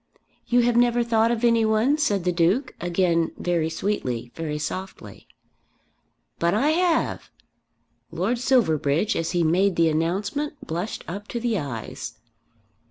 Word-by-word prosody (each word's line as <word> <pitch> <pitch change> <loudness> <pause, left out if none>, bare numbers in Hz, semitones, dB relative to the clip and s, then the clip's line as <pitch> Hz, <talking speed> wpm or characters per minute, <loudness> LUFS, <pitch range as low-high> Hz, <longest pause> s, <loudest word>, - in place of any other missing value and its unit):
"You 245 0 +4
have 240 0 +2
never 240 0 +3
thought 230 -1 +2
of 235 0 -1
any 230 -1 +4
one?" 220 +6 +3
said 205 - +1
the 180 - +1
Duke, 185 +10 +1
again 170 -1 +1
very 170 -3 0
sweetly, 130 - -3
very 155 0 -4
softly. 185 +5 -7 1.1
"But 170 +3 +2
I 280 +8 +2
have!" 340 0 0 0.8
Lord 240 0 -1
Silverbridge 205 - +2
as 165 +2 -2
he 175 -1 +2
made 180 +4 +2
the 165 -1 +3
announcement 200 - -2
blushed 175 +6 -4
up 200 +5 -6
to 240 - -4
the 230 -4 0
eyes. 120 -4 -6
195 Hz, 140 wpm, -24 LUFS, 165-235 Hz, 1.1 s, You